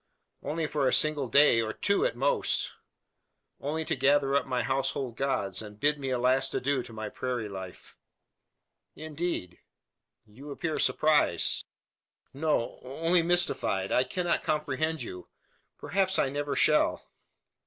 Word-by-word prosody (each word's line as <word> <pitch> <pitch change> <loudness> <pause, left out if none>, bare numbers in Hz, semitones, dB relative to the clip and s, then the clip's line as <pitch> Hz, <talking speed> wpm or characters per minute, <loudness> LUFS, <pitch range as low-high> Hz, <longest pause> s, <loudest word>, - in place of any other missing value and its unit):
"Only 160 +3 -2
for 150 -2 0
a - - +2
single 150 -3 +2
day, 130 -1 +5
or 110 -1 -3
two 200 - +1
at - - -6
most. - - +1 0.9
Only 155 +3 -3
to - - -1
gather 140 +1 +3
up 140 -1 +1
my 125 -2 -1
household 135 -1 -2
gods, 115 -9 -1
and 105 -1 -11
bid 145 +1 +1
a 130 -2 0
last 130 +2 +1
adieu 140 0 0
to 120 - -11
my 110 -1 -5
prairie 125 0 -3
life." 95 -2 -9 1.0
"Indeed!" 155 - -4 0.7
"You 125 +8 -13
appear 155 +2 -3
surprised." 150 - +2 0.7
"No! 145 -4 -1
only 165 +7 +1
mystified. 170 - +1
I 125 - +3
cannot 175 +7 -1
comprehend 155 0 -1
you. 90 -5 -8 0.5
Perhaps 190 +5 0
I 135 - +2
never 145 0 -3
shall!" 150 +2 +2
140 Hz, 135 wpm, -28 LUFS, 125-155 Hz, 1.0 s, day